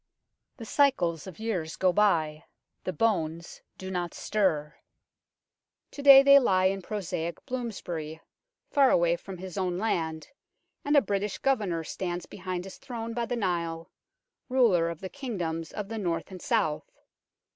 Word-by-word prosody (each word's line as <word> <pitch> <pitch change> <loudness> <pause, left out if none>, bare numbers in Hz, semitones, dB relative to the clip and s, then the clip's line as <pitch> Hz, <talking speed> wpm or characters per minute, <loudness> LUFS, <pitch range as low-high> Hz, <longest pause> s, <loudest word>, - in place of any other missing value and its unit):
The 230 - -8
cycles 195 - +1
of 185 - -9
years 185 -8 -3
go 185 -1 +2
by, 160 -7 +2 0.4
the 185 - -1
bones 170 -6 -1 0.2
do 190 0 -7
not 175 -2 -3
stir. 160 -8 0 1.2
To 285 - -8
day 275 -1 +10
they 280 0 +8
lie 185 -7 +2
in 195 +1 +1
prosaic 175 -4 -4
Bloomsbury, 180 - -5 0.5
far 275 -2 +5
away 170 0 +3
from 185 +2 -9
his 185 +1 -6
own 180 -2 -1
land, 160 -6 -2 0.5
and 290 +1 +3
a 280 - +6
British 200 0 -2
Governor 205 -11 0
stands 175 +1 -4
behind 185 -2 -5
his 195 - -10
throne 230 -3 -6
by 235 0 -2
the 245 - -2
Nile, 170 -6 -2 0.6
ruler 220 -10 +3
of 170 -2 -7
the 190 - -5
King 260 -4 -6
doms 165 -2 -3
of 210 -2 -5
the 225 +1 -5
North 170 -2 -2
and 185 -2 -9
South. 205 - 0
190 Hz, 155 wpm, -28 LUFS, 170-225 Hz, 1.2 s, day